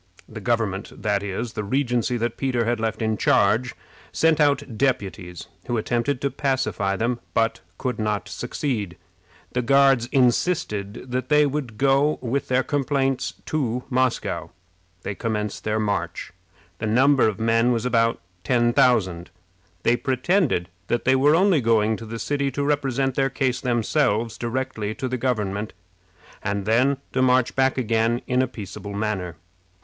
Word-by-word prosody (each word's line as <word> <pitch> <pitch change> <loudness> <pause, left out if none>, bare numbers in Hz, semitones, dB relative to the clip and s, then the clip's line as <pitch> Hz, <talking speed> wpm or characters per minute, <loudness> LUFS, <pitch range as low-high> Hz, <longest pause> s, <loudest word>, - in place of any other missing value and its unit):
The - - -9
government 105 -4 -2
that 105 -2 +1
is, 100 +4 -4
the 105 - -3
regency 125 +1 0
that 120 0 -2
Peter 125 -4 0
had 120 0 0
left 110 0 -2
in 110 -1 0
charge 110 +7 +2 0.4
sent 160 -1 +2
out 140 -5 +1
deputies, 100 - -2 0.2
who 120 - 0
attempted 120 +5 -1
to 140 - 0
pacify 110 -8 -1
them, 120 +3 -1 0.2
but 115 0 +1 0.2
could 125 -4 -3
not 105 -1 -1
succeed. 120 - -3 0.5
The 125 - 0
Guards 135 -1 +4
insisted 120 - 0
that 130 +1 -2
they 150 0 +5
would 135 -6 -3
go 140 +3 +3
with 130 +3 -2
their 130 +1 +2
complaints 135 -2 -1
to 125 -5 -1
Moscow. 105 -10 0 0.5
They - - -3
commenced 105 -1 -3
their 110 0 0
march. 100 -4 -2 0.5
The 110 - -2
number 130 +4 +4
of 110 -1 -2
men 115 +2 +3
was 115 0 0
about 115 -2 +2 0.2
ten 120 +2 +2
thousand. 95 -10 +2 0.5
They 120 - +4
pretended 130 - +1 0.2
that 120 - -1
they 130 - +4
were 145 +4 +4
only 180 -4 +4
going 110 -1 +2
to 115 - -9
the 115 +1 -5
city 140 +3 -1
to 140 - -1
represent 135 -2 0
their 135 +1 +1
case 130 -1 -1
themselves 115 -2 +1
directly 120 -3 -3
to 130 - -3
the 130 0 -2
government, 105 -4 -2 0.7
and 100 -1 -2
then 125 +6 +3 0.2
to 130 - +1
march 130 -1 +3
back 135 0 +2
again 115 0 +1
in 125 0 +1
a 130 - +1
peaceable 105 -3 -8
manner. 100 -5 -2
120 Hz, 155 wpm, -23 LUFS, 110-130 Hz, 0.7 s, they